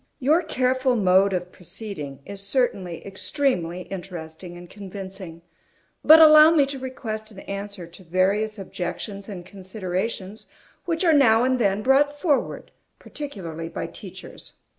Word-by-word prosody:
Your 305 +6 +3
careful 260 -4 +1
mode 195 -2 +4
of 180 -1 -3
proceeding 175 -7 -8
is 200 -1 -8
certainly 200 - -1
extremely 195 - -1
interesting 175 -2 -8
and 175 0 -11
convincing; 190 -3 -8 0.6
but 315 +1 +9
allow 310 0 +9
me 315 -4 +4
to 275 0 -5
request 220 -4 -6
an 195 -3 -12
answer 200 -2 -6
to 170 +3 -14
various 195 +5 +1
objections 195 +2 -6
and 180 -4 -7
considerations 190 +2 -5 0.4
which 335 0 -1
are 330 - +5
now 235 -5 +5
and 255 0 +1
then 205 -2 +1
brought 285 +2 +3
forward, 290 -4 -1 0.3
particularly 170 - -7
by 165 - -4
teachers. - - -10
200 Hz, 135 wpm, -24 LUFS, 180-255 Hz, 0.6 s, but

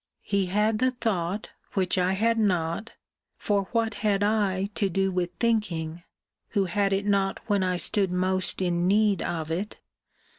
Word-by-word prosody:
He 200 -2 0
had 210 +3 +1
the 255 +1 +3
thought 210 -6 -2 0.2
which 185 -2 +1
I 180 +1 +2
had 225 +3 +1
not 180 0 0 0.4
(for 200 -2 0
what 230 -2 +1
had 205 -2 +2
I 200 -2 +1
to 200 -1 0
do 195 +2 0
with 180 -1 -1
thinking, 175 -8 0 0.6
who 195 - +3
had 195 +2 0
it 195 +1 0
not 200 -1 +1
when 205 -3 +1
I 185 -1 0
stood 195 +1 +1
most 185 +1 +1
in 175 0 +1
need 205 -1 +3
of 160 -2 -3
it?) 190 +6 -3
195 Hz, 160 wpm, -26 LUFS, 180-210 Hz, 0.6 s, the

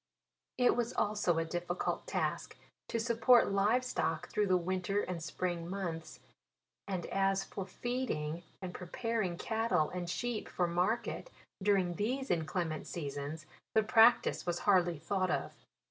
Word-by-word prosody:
It 250 -1 +4
was 240 0 -1
also 205 -5 +1
a 165 - +1
difficult 175 +2 -2
task - - -2 0.3
to 230 - -1
support 235 0 +4
live 210 +6 +3
stock 165 -8 -1
through 210 -1 +1
the 185 -1 +4
winter 185 +3 0
and 180 -4 -4
spring 170 +1 -3
months; 175 -4 -5 0.7
and 185 -3 -2
a3 195 +1 +1
for 195 -1 -6
feeding, 185 -9 -2 0.2
and 180 -1 -5
preparing 195 0 -2
catttle 220 -8 0
and 175 -1 -3
sheep 240 +3 -2
for 180 - 0
market 180 - -1 0.3
during 190 -3 +2
these 255 +6 -1
inclement 160 -1 -1
seasons, 145 0 -5 0.3
the 220 - +5
practice 225 +2 +5
was 175 0 -2
hardly 180 -5 +4
thought 185 +4 -1
of. - - -1
185 Hz, 140 wpm, -33 LUFS, 170-220 Hz, 0.7 s, the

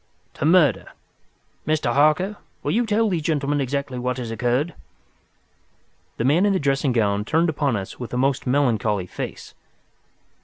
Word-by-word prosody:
"To - - -3
murder. 165 -2 +3 0.7
Mr. 155 -6 +1
Harker, 155 - +2 0.3
will - - -1
you 235 +1 +1
tell 220 +1 +2
these 180 -5 -1
gentlemen 145 -2 0
exactly 135 -1 -3
what 125 +1 -2
has 120 -3 -5
occurred?" 125 +8 0 1.4
The - - -1
man 155 +8 +3
in 205 -1 +3
the 190 - +1
dressing 140 -1 +1
gown 105 -3 +1
turned 160 +9 +1
upon 145 -5 0
us 95 -2 -6
with 120 - -6
a 125 - -2
most 135 +1 0
melancholy 115 -8 +1
face. - - -7
140 Hz, 155 wpm, -22 LUFS, 120-155 Hz, 1.4 s, murder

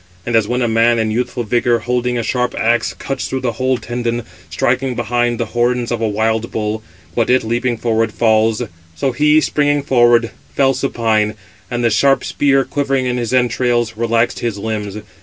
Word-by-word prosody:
And 120 - -1
as 110 -2 +3
when 125 +2 0
a - - +1
man 115 +1 +3
in 110 -1 0
youthful 120 +2 -2
vigour, 120 +2 +1
holding 125 +1 -1
a 120 - -1
sharp 125 +1 -1
axe, 115 +1 +1
cuts 135 -1 -4
through 130 - -3
the 125 -2 0
whole 130 +3 0
tendon, 120 0 -3 0.3
striking 125 +9 0
behind 120 0 0
the 115 - 0
horns 120 0 0
of 120 -1 -2
a 115 - +1
wild 110 +2 0
bull; 110 0 -3 0.3
but 115 - +1
it, 130 +1 +3
leaping 120 +2 -1
forward, 115 -1 0
falls; 110 +1 +2 0.3
so 130 +11 0
he, 150 +5 +4
springing 145 -2 +1
forward, 120 -3 +3 0.2
fell 135 -1 +3
supine; 110 -5 0 0.3
and 120 0 -2
the 115 - +3
sharp 135 +6 +3
spear, 135 -2 +2
quivering 135 -2 -1
in 125 0 -1
his 120 -2 -2
entrails, 120 -2 +1
relaxed 115 +1 0
his 115 -4 -2
limbs. 105 -1 -4
120 Hz, 185 wpm, -17 LUFS, 115-125 Hz, 0.3 s, he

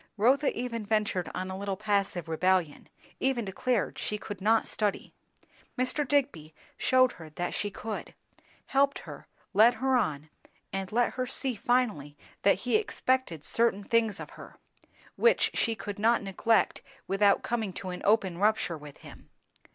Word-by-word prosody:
Rotha 265 +7 +3
even 235 -3 -3
ventured 210 -4 0
on 185 +1 -3
a - - -4
little 195 0 -3
passive 200 -4 -1
rebellion; 175 -1 0 0.3
even 260 -4 0
declared 215 +3 -1
she 210 - -2
could 205 -2 -8
not 220 +2 +3
study. 210 -2 -2 0.6
Mr. 255 +3 0
Digby 170 - 0 0.2
shewed 255 -1 +3
her 160 -2 -11
that 175 +3 -4
she 205 - -1
could; 215 +2 -6 0.5
helped 280 +1 +2
her, - - -10 0.3
led 225 +5 +6
her 265 +3 +1
on, 155 - -1 0.4
and 195 -1 -3
let 240 +2 +2
her 255 0 -2
see 265 0 -1
finally 215 - 0 0.2
that 200 -1 +3
he 250 - +4
expected 260 - -1
certain 230 -1 +1
things 225 -1 +1
of - - -8
her, - - -12 0.6
which 475 0 +4
she 230 -1 0
could 205 -1 -6
not 230 +1 +3
neglect 215 +3 +1 0.3
without 200 +1 +3
coming 225 -4 -2
to 185 - -6
an 180 - -6
open 195 -5 +2
rupture 205 -6 +1
with 145 -1 -12
him. - - -13
210 Hz, 155 wpm, -29 LUFS, 190-245 Hz, 0.6 s, led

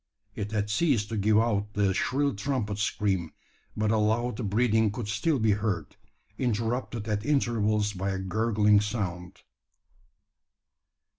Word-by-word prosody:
It 105 -1 -5
had 105 -1 -1
ceased 125 -7 +1
to 115 - -3
give 105 +1 +3
out 105 -2 +1
the 100 -2 +2
shrill 140 +7 0
trumpet 105 -1 -2
scream; 95 -6 -1 0.4
but 105 0 +1
a 110 - +2
loud 110 +1 0
breathing 110 0 +3
could 110 0 -5
still 110 +9 0
be 110 -3 +2
heard, 100 -4 -2 0.4
interrupted 115 -1 -2
at 105 -1 -1
intervals 110 -6 +1
by 95 +1 -3
a 95 - -2
gurgling 105 +2 +2
sound. 95 -5 -4
105 Hz, 135 wpm, -28 LUFS, 100-115 Hz, 0.4 s, give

